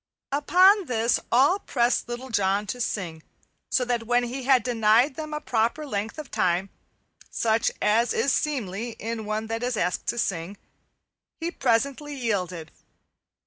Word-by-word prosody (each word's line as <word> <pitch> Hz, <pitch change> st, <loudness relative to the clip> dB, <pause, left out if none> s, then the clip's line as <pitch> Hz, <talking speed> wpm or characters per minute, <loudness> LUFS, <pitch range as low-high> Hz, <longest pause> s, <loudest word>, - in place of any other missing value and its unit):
Upon 370 Hz, +8 st, +5 dB
this 230 Hz, 0 st, +1 dB
all 280 Hz, +11 st, +4 dB
pressed 240 Hz, -6 st, 0 dB
Little 245 Hz, +2 st, -6 dB
John 200 Hz, -1 st, +1 dB
to 245 Hz, +5 st, -5 dB
sing, 170 Hz, -8 st, -3 dB, 0.5 s
so 250 Hz, -, +1 dB
that 240 Hz, -2 st, -2 dB
when 245 Hz, 0 st, +3 dB
he 250 Hz, +2 st, -5 dB
had 260 Hz, -4 st, +4 dB
denied 235 Hz, +3 st, +3 dB
them 310 Hz, +2 st, -6 dB
a 300 Hz, -, -3 dB
proper 240 Hz, +4 st, 0 dB
length 215 Hz, -3 st, -4 dB
of 305 Hz, -4 st, -8 dB
time, 180 Hz, +2 st, 0 dB, 0.6 s
such 225 Hz, 0 st, +1 dB
as 225 Hz, +3 st, +3 dB
is 275 Hz, -, +1 dB
seemly 235 Hz, -6 st, -2 dB
in 225 Hz, -1 st, -5 dB
one 215 Hz, +1 st, -2 dB
that 225 Hz, +1 st, -4 dB
is 245 Hz, -2 st, -1 dB
asked 180 Hz, -2 st, -1 dB
to -, -, -1 dB
sing, 190 Hz, -2 st, -2 dB, 0.8 s
he 335 Hz, +1 st, -2 dB
presently 280 Hz, +3 st, 0 dB
yielded. 185 Hz, -, -3 dB
235 Hz, 150 wpm, -25 LUFS, 210-265 Hz, 0.8 s, Upon